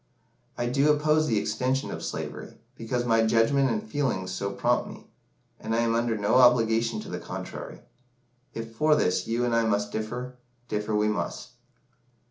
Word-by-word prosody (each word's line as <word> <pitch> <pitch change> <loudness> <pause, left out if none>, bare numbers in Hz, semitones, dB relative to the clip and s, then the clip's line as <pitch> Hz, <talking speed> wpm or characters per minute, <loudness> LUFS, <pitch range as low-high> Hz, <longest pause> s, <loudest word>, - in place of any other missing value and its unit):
I 120 - -1
do 140 +5 +3
oppose 155 +1 +2
the 110 - +1
extension 130 +5 -1
of - - -6
slavery, - - -6 0.2
because 120 +1 -2
my 115 -1 +3
judgment 115 +5 +3
and 110 -3 -1
feelings 110 -8 -1
so 100 +2 -3
prompt - - 0
me; - - -11 0.5
and 115 - -2
I 115 - +2
am 115 -1 +1
under 115 -1 0
no 105 +4 +2
obligations 115 -3 +4
to - - -10
the - - -4
contrary. - - -7 0.7
If 115 0 -6
for 155 +5 +4
this 90 -9 +1
you 120 +2 0
and 120 -1 +1
I 115 - +3
must 105 -1 0
differ, 125 +4 -5 0.3
differ 105 0 -2
we 105 0 +2
must." 105 - -3
115 Hz, 170 wpm, -27 LUFS, 110-125 Hz, 0.7 s, obligations